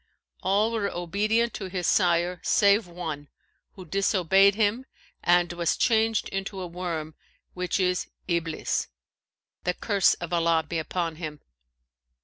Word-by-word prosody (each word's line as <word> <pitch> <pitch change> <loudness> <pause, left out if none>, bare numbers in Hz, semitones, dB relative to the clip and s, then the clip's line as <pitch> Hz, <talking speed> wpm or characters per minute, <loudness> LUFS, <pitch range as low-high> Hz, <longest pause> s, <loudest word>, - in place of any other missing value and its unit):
All 205 +4 +2
were 215 -3 -1
obedient 210 +7 0
to 190 -3 -5
their 180 -1 -3
sire, 175 -1 +2
save 200 -1 +3
one 160 -4 -6 0.5
who 185 -2 -11
disobeyed 195 +1 +3
him 225 +4 0 0.4
and 175 0 +3
was 170 -1 0
changed 225 -2 +2
into 195 0 -4
a 185 - -4
worm 170 -3 -4 0.4
which 180 +2 -2
is 180 -1 0 0.2
Iblis 170 -2 -1 0.8
(the 180 0 0
curse 200 -4 +2
of 175 0 -6
Allah 165 -1 +2
be 165 +2 -2
upon 165 0 -3
him!). 155 -3 -6
180 Hz, 130 wpm, -26 LUFS, 170-200 Hz, 0.8 s, save